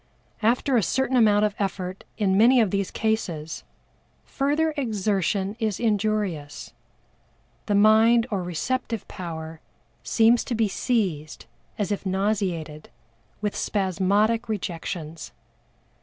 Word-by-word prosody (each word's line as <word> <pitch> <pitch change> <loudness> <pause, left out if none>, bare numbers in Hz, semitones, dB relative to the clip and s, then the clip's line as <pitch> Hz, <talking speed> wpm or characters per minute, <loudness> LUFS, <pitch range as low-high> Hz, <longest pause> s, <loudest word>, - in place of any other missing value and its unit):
After 245 +4 +2
a - - +4
certain 265 +7 0
amount 210 -3 +4
of 210 - -1
effort 185 -1 -3
in 195 -3 +2
many 240 +5 +6
of 215 -5 +2
these 200 -1 -1
cases, 175 -9 -2 0.6
further 300 +3 0
exertion 205 - -1
is 215 -4 -1
injurious, 205 -9 -1 0.9
the 205 - +1
mind 220 +3 +5
or 200 -3 -1
receptive 225 +6 -3
power 160 -2 -7 0.4
seems 230 +1 +3
to 240 - -2
be 225 -1 +2
seized 185 - -2 0.3
as 205 -1 -2
if 205 - -2
nauseated 185 -6 -2 0.5
with 210 -1 -2
spasmodic 205 +4 +1
rejections. 165 -5 -5
205 Hz, 110 wpm, -25 LUFS, 185-225 Hz, 0.9 s, many